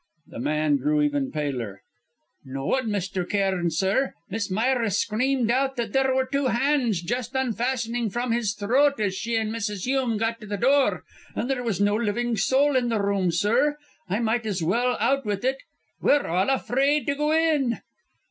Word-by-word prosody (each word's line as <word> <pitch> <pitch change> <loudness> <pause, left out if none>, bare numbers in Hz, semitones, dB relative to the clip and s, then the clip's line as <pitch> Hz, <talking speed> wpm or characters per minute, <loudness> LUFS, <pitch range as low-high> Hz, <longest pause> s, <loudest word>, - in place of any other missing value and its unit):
The - - -10
man 150 +2 +1
grew 150 +2 +1
even 145 -2 0
paler. 125 -10 -4 0.6
"No 135 0 -6
one, 260 - 0
Mr. 190 -2 -2
Cairn, 190 -4 +1
sir. 195 - 0 0.2
Miss 205 -1 -2
Myra 230 +3 +1
screamed 235 +4 +1
out 270 +2 +1
that 230 -4 -3
there 265 -1 +2
were 260 0 +2
two 275 0 0
hands 240 - +1
just 245 +6 -3
unfastening 240 -2 -1
from 240 +4 -2
his 225 -4 0
throat 265 +7 +2
as 205 -3 0
she 230 +4 -3
and 220 -1 -1
Mrs. 210 -4 -3
Hume 255 -3 0
got 225 +1 -2
to 215 - -9
the 205 0 -3
door, 270 +4 +2 0.3
and - - -2
there 265 -2 -1
was 225 -6 -2
no 205 +1 +3
living 235 +2 0
soul 265 +8 +2
in 245 -2 +2
the 225 -2 0
room, 200 -2 +1
sir. 240 - +2 0.3
I 200 - 0
might 230 0 0
as 190 -5 -2
well 245 +9 +1
out 275 0 +2
with 205 0 -3
it! 265 +1 0 0.4
We're 290 - +3
all 185 +6 +1
afraid 275 +2 +1
to 280 - +1
go 300 +2 0
in!" 310 -7 +2
230 Hz, 185 wpm, -25 LUFS, 195-260 Hz, 0.6 s, no